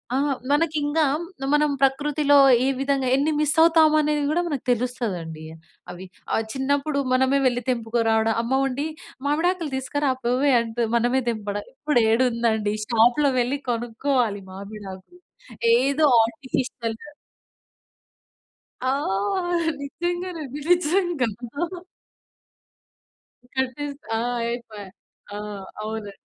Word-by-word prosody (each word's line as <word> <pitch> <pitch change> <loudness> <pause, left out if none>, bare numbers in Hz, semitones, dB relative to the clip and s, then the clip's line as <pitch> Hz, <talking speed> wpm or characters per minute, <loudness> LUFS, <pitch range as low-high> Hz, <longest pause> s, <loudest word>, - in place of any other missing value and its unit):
ఆహ్, 280 +1 +1 0.2
మనకి 310 +2 +2
ఇంగా 295 +2 +1 0.5
మనం 300 0 +3
ప్రకృతిలో 285 +2 +3 0.3
ఏ - - +2
విధంగా 275 -1 0
ఎన్ని 285 +3 +1
మిస్ 300 -1 +2
అవుతాము 320 -2 +5
అనేది 300 -1 0
కూడా 340 +3 +1
మనకు 285 -6 -3
తెలుస్తదండి 215 -10 -3 0.5
అవి 180 +1 -9 0.3
ఆహ్, 225 - +1
చిన్నప్పుడు 280 +2 0
మనమే 265 +2 +3
వెళ్లి 245 -1 0
తెంపుకోరావడం, 225 -2 +1
అమ్మ 235 +3 -2
ఉండి 275 +3 -2 0.4
"మామిడాకులు 330 +2 0
తీసుకురా 270 +2 -1
పోవే" 255 +4 +2
అంటూ 230 +1 -4 0.2
మనమే 245 +3 +1
తెంపడం, 205 -2 -4
ఇప్పుడేడుందండి 235 -5 +1
షాప్‌లో 245 +5 +3
వెళ్లి 250 +4 0
కొనుక్కోవాలి 235 -2 -1
మామిడాకులు 200 - -10 0.6
ఏదో 280 +3 +2 0.2
ఆర్టిఫిషియల్. 230 -1 -3 1.9
ఆ! - - +3 0.9
నిజంగానండి 335 -1 -4
నిజంగా. 350 -4 +2 2.3
కటేసి 275 +2 -2 0.2
ఆ! - - -1 0.3
ఐపాయ్. 215 -5 -8 0.5
ఆ! - - -4 0.4
అవునండి. 215 -1 -5
265 Hz, 100 wpm, -23 LUFS, 225-295 Hz, 2.3 s, అవుతాము